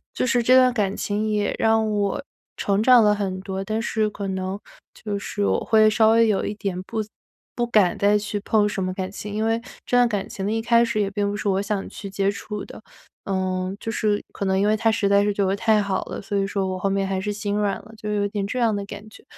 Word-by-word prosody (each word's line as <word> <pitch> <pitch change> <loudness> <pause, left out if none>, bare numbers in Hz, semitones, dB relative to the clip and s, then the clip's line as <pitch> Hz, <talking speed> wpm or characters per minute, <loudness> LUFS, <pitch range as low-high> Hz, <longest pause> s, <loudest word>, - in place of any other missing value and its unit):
就 - - 0
是 250 -2 +2
这 255 +3 +5
段 255 -1 +5
感 205 -3 0
情 210 +1 -1
也 210 -1 0
让 220 -1 +3
我 205 -2 -1 0.3
成 200 +1 +1
长 245 -2 +7
了 210 - +4
很 190 -2 -3
多， 190 0 -4
但 215 +3 -2
是 220 -2 0
可 205 -1 -6
能 190 +1 -3 0.4
就 205 -2 -4
是 205 0 -2
我 - - +2
会 220 -1 +5
稍 220 0 +4
微 230 0 +5
有 205 -3 +1
一 210 - -2
点 195 -3 -3
不 220 +2 -3 0.5
不 240 - 0
敢 205 -6 +3
再 205 +1 +3
去 205 0 -3
碰 210 0 +2
什 195 -2 -3
么 185 0 -2
感 185 0 -4
情。 205 0 -7
因 215 +1 -1
为 225 +1 +1 0.2
这 245 - 0
段 245 0 +5
感 205 -2 -2
情 195 - -5
的 210 - 0
一 225 - 0
开 235 0 +4
始 230 -2 -1
也 195 - 0
并 200 0 -1
不 205 - -3
是 210 - -3
我 195 0 +1
想 200 -1 -2
去 200 - -8
接 195 +1 0
触 210 +1 -6
的， - - -11 0.4
呃， 185 -1 -1
就 225 - -4
是 210 -1 0
可 200 - -4
能 190 0 +1
因 205 - +2
为 215 - +3
他 225 +1 +2
实 215 -2 0
在 200 0 +4
是 205 - +1
对 200 -1 0
我 190 - +1
太 215 +1 +3
好 195 -2 -2
了， - - -6
所 205 0 -5
以 195 - +1
说 195 -1 -1
我 185 0 -3
后 195 - 0
面 195 0 0
还 190 -1 -2
是 210 +1 -2
心 205 0 -3
软 205 -2 +1
了， 220 - -16
就 210 0 -5
有 205 -1 +1
点 200 -1 -2
这 250 +5 -3
样 225 -3 +2
的 200 - -3
感 205 +1 -9
觉。 - - -16
205 Hz, 285 characters per minute, -23 LUFS, 195-220 Hz, 0.5 s, 长